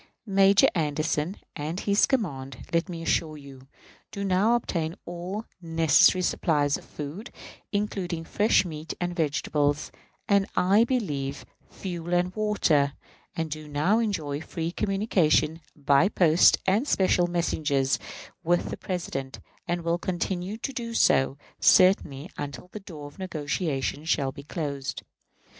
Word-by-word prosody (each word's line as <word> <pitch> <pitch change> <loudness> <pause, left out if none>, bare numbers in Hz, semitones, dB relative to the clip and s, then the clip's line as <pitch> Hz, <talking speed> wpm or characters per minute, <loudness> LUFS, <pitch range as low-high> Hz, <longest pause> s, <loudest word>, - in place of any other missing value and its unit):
Major 195 -1 +5
Anderson 155 +2 -1 0.2
and 160 +4 -4
his 200 0 +3
command, 140 - -2
let 170 +3 +1
me 165 -2 -6
assure 155 -2 0
you, 135 -2 -13 0.4
do 200 - -5
now 200 +5 +3
obtain 170 -8 -2
all 180 +5 -5 0.2
necessary 165 +2 +4
supplies 145 -4 +1
of - - -7
food 155 +10 -7 0.4
(including 190 -5 -2
fresh 205 +4 +2
meat 155 -2 -6
and 175 0 -2
vegetables), 150 -2 0 0.4
and, 200 -1 +3
I 200 +5 +4
believe, 145 - -2 0.2
fuel 175 -2 -4
and 180 +1 0
water; 165 -10 +2 0.4
and 165 -2 -3
do 155 0 -6
now 150 +10 +2
enjoy 160 -10 -2
free 165 +1 -4
communication, 180 -5 +1
by 145 +5 +3
post 170 -4 +5
and 210 +9 +2
special 185 -5 +3
messengers, 150 -6 0 0.4
with 175 +1 +1
the - - -4
President, 135 -8 -4 0.3
and 175 0 -1
will 170 +1 0
continue 185 +3 -3
to 270 +4 -5
do 230 -2 -5
so, 135 -8 +3 0.2
certainly, 165 -6 +4
until 145 +3 -6
the 215 - -7
door 160 -7 -10
of 145 +5 -12
negotiation 155 -4 -2
shall 140 -4 +1
be 140 - -10
closed. 140 -3 -4
170 Hz, 135 wpm, -26 LUFS, 145-190 Hz, 0.4 s, Major